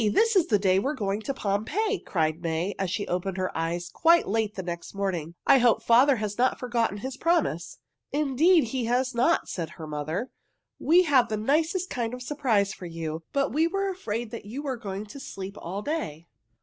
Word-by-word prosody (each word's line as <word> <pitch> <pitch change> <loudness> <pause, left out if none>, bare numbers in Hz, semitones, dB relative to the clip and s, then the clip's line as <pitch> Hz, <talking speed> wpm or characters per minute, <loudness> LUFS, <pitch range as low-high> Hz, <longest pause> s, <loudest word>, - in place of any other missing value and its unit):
This 455 - +3
is 370 -4 +4
the 210 - +4
day 190 -1 +3
we 205 - -1
are 300 - -1
going 205 -3 -2
to 275 - -3
Pompeii!" 275 - -1
cried 160 -2 -1
May, 170 +3 -1
as 190 -2 -1
she 205 +3 -2
opened 185 +1 -2
her 185 0 -2
eyes 170 +2 -2
quite 335 - +4
late 215 0 -1
next 175 0 -5
morning. 175 -5 -2
"I 275 -1 +6
hope 240 -2 +3
father 255 +4 +5
has 210 -1 -4
not 255 +1 +3
forgotten 235 -5 0
his 260 +5 -6
promise." 320 - 0 0.3
"Indeed 300 +4 +4
he 255 -3 -1
has 250 +2 +1
not!" 250 +8 +2
said 165 -4 -4
her 160 - -7
mother. 155 - -3 0.5
"We 350 +4 +5
have 265 -7 +3
the 215 - -1
nicest 320 - 0
kind 240 -1 -2
of 250 - -10
a - - -5
surprise 240 -8 +1
for 180 - -8
you, 165 -1 -5
but 280 0 0
we 315 +3 +3
were 390 +2 -1
afraid 235 - -4
you 240 +8 -6
were 270 -3 -2
going 200 -2 -5
to 215 +7 -10
sleep 195 -6 -7
all 195 +4 -5
day." 190 - -3
225 Hz, 200 wpm, -27 LUFS, 190-280 Hz, 0.5 s, I